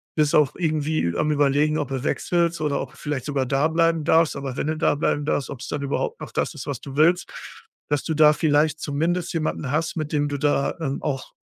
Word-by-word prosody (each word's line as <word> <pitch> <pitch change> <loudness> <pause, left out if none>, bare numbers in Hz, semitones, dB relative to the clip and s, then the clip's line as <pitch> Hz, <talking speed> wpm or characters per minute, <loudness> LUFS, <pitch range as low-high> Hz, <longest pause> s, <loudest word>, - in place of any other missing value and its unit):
bist 155 0 +2
auch 150 -3 +3
irgendwie 155 - 0
am 150 - +1
Überlegen, 145 +1 +2
ob 145 - -2
du 135 -2 -3
wechselst 170 +1 0
oder 150 -2 0
ob - - -7
du - - -19
vielleicht 145 -4 -4
sogar 140 -3 -1
da 135 +4 +2
bleiben 165 -1 +2
darfst, 160 +1 +3
aber 135 -2 -5
wenn - - -1
du 155 0 -1
da 160 - +2
bleiben 145 0 0
darfst, 145 -2 -1
ob's 135 -2 -7
dann 145 - -3
überhaupt 140 0 -2
noch - - -7
das - - -1
ist, - - -8
was - - -3
du 135 - -9
willst. 170 +4 +3 0.6
Dass 145 -1 0
du 160 - -2
da 150 -1 +6
vielleicht 150 0 +2
zumindest 165 +4 -1
jemanden 155 -4 -2
hast, 155 +2 -1
mit 155 -2 -3
dem 145 -1 +1
du 145 - -2
da, 145 -1 +1
ähm, 140 -3 -2
auch 135 -4 -3
150 Hz, 230 wpm, -23 LUFS, 140-160 Hz, 0.6 s, da